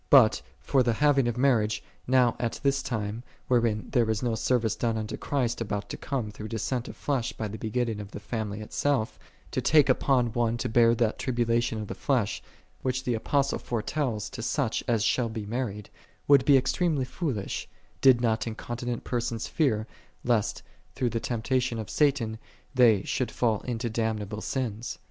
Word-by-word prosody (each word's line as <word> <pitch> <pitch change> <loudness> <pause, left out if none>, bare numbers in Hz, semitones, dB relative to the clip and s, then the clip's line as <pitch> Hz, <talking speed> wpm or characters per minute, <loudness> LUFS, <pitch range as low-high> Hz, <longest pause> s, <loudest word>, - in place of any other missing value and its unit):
But 120 - +6 0.2
for 135 - +2
the 120 -2 +2
having 140 0 +3
of 120 0 -1
marriage, 110 -6 +2 0.2
now 125 -2 +4
at 120 -1 -2
this 140 0 +2
time, 110 -2 -3 0.3
wherein 115 -4 +1
there 120 -4 +2
is 110 +2 0
no 120 -2 +1
service 110 -1 +1
done 115 -2 0
unto 110 -1 -3
Christ 120 -5 -1
about 105 -2 -3
to - - -4
come 125 -7 -3
through 105 +1 -7
descent 120 +2 -2
of - - -8
flesh 135 -5 -1
by 110 - -4
the 105 +1 -7
begetting 110 -1 -1
of 100 -1 -7
the 100 - -7
family 105 -1 -4
itself, 125 +2 -1 0.3
to - - -1
take 150 -3 +5
upon 125 -4 +2
one 120 -1 +1
to 125 - -2
bear 115 0 +4
that 115 -2 0
tribulation 120 -3 0
of 105 - -5
the - - -4
flesh, 120 -7 0 0.4
which 130 0 -1
the 125 - 0
Apostle 140 +5 0
foretells 115 -2 -2
to 130 - -6
such 125 0 0
as 115 -3 +2
shall 120 0 +2
be 110 -2 -5
mar 120 +4 -1
ried, 105 0 -9 0.4
would 140 -2 +6
be 140 -2 +7
extremely 145 +1 +1
foolish, 125 - -3 0.3
did 130 -3 +6
not 115 -1 +1
in 110 - -4
continent 120 0 -4
persons 115 -2 -2
fear, 115 -10 +1 0.4
lest, 120 -4 0 0.3
through 125 -2 0
the 115 - -1
temptation 125 +1 -1
of 110 -2 -5
Satan, 130 -7 +1 0.3
they 115 -6 +5
should 130 - -1
fall 110 -4 0
into 120 -1 -2
damnable 110 -2 -2
sins. 120 -3 -3
120 Hz, 180 wpm, -27 LUFS, 110-130 Hz, 0.4 s, be